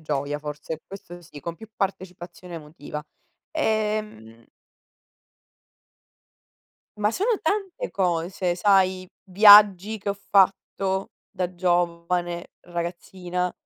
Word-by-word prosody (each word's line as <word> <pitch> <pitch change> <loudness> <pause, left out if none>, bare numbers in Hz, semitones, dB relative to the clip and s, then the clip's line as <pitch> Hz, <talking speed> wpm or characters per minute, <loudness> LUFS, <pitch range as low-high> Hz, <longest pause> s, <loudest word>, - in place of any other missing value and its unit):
gioia, 145 -1 -2
forse, 150 +1 -6
questo 175 -3 -10
sì, 150 -3 -12
con 170 +2 -6
più 220 -1 -12
partecipazione 180 -2 -5
emotiva. 150 -1 -8 0.5
E, 215 -7 +1
mhmm 115 - -15 2.5
Ma 210 0 +1
sono 420 - 0
tante 405 +7 -2
cose, 175 0 -1
sai: 185 -1 +2 0.2
viaggi 205 +1 +7
che 200 - -6
ho - - -2
fatto 195 0 +1 0.2
da 185 -2 -3
giovane, 175 0 -1 0.2
ragazzina 180 +1 -4
180 Hz, 95 wpm, -24 LUFS, 170-200 Hz, 2.5 s, viaggi